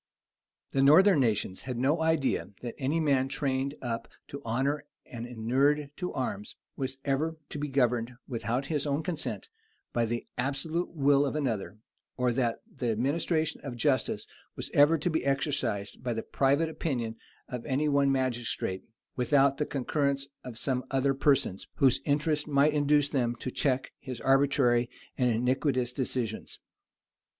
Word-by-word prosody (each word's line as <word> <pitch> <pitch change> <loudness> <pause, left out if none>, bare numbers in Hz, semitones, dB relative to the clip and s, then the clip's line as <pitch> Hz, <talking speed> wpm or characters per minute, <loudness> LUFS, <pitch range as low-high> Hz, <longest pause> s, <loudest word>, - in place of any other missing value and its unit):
] - - -54
The 135 - +2
northern 160 +5 +7
nations 105 -6 0
had 125 - -2
no 145 +7 +2
idea 160 -4 +1
that 120 - -4
any 145 +4 0
man 140 -4 +2
trained 135 0 -1
up 115 -2 -3 0.2
to 140 - -7
honor 135 +6 -1 0.2
and 120 0 -7
inured 135 +5 +1
to 180 -1 -3
arms, 210 -2 -4 0.2
was 130 -1 -3
ever 155 +4 0
to 150 - -5
be 150 - -2
governed, 125 -3 +1
without 120 +1 -2
his 150 0 -1
own 145 +2 0
consent, 160 -2 -4 0.4
by 120 -1 +2
the 120 +1 -3
absolute 145 +7 -1
will 140 -3 +3
of 145 0 -1
another; 115 -8 -2 0.4
or 125 -1 +2
that 120 -1 -1
the 120 - -4
administration 155 +7 0
of 135 -4 -5
justice 130 +2 +1 0.3
was - - -4
ever 145 +3 +6
to 155 +4 -1
be 160 - 0
exercised 135 -7 -1
by 125 -1 -1
the 115 - -3
private 140 +4 +2
opinion 125 -8 -2 0.3
of 125 -2 -5
any 145 +2 +1
one 140 -1 +3
magistrate, 120 -7 -1 0.3
without 135 +2 +3
the 150 - 0
concurrence 140 0 0 0.2
of 125 -3 -7
some 130 +1 -1
other 135 +1 +2
persons, 135 - +1
whose 135 -1 +3
interest 150 +1 +1
might 145 +1 +3
induce 145 -1 +3
them 120 -4 +1
to 130 - -5
check 130 -2 0
his 130 -3 -7
arbitrary 135 -3 +3 0.3
and 125 -2 +2
iniquitous 125 +1 +1
decisions. 125 -4 -3
135 Hz, 155 wpm, -29 LUFS, 125-145 Hz, 0.4 s, northern